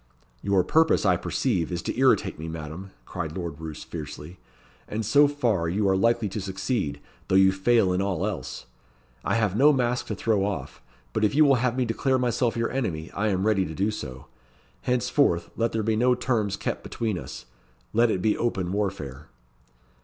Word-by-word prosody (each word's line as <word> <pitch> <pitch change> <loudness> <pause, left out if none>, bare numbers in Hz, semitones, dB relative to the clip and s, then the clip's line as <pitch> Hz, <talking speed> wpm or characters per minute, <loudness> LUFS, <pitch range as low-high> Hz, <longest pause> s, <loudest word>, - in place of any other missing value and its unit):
"Your 100 -2 +2
purpose, 160 - +3
I - - +5
perceive, 85 0 -1
is 85 0 -3
to - - -3
irritate 130 - +2
me, 80 - -5
Madam," 80 +4 -7 0.2
cried 85 -4 -5
Lord 85 -4 -5
Roos, 80 -2 -7
fiercely; 75 +2 -8 0.5
"and 110 +1 -3
so 145 +7 +5
far 115 -12 0
you 100 +3 +1
are 95 - +3
likely 115 +3 +2
to 100 +2 -4
succeed, 95 - -2 0.3
though - - +1
you 95 0 +6
fail 95 0 +2
in 90 - +1
all 95 -4 -1
else. - - -5 0.6
I - - 0
have 105 -4 +1
no 140 +6 +6
mask 125 -3 0
to 105 - -3
throw 105 -1 +1
off; 100 -1 -4 0.3
but - - 0
if 105 +5 +2
you 155 +1 +6
will 140 - +5
have 125 -1 0
me 130 - +2
declare 130 +3 +1
myself 120 -1 0
your 115 0 0
enemy, 90 -12 -3
I 105 +2 -1
am 95 -1 0
ready 105 -3 +3
to 80 -3 -6
do 100 +5 +1
so. 65 -9 -7 0.6
Henceforth, 125 - +1
let 115 0 0
there 110 -1 -1
be 110 +1 +1
no 125 +3 +3
terms 110 -6 -1
kept - - -3
between 110 -6 -3
us - - -9 0.5
let 115 +1 +4
it 90 -4 -1
be 110 - +3
open 95 -7 -1
warfare." 95 -9 -3
100 Hz, 190 wpm, -26 LUFS, 90-120 Hz, 0.6 s, you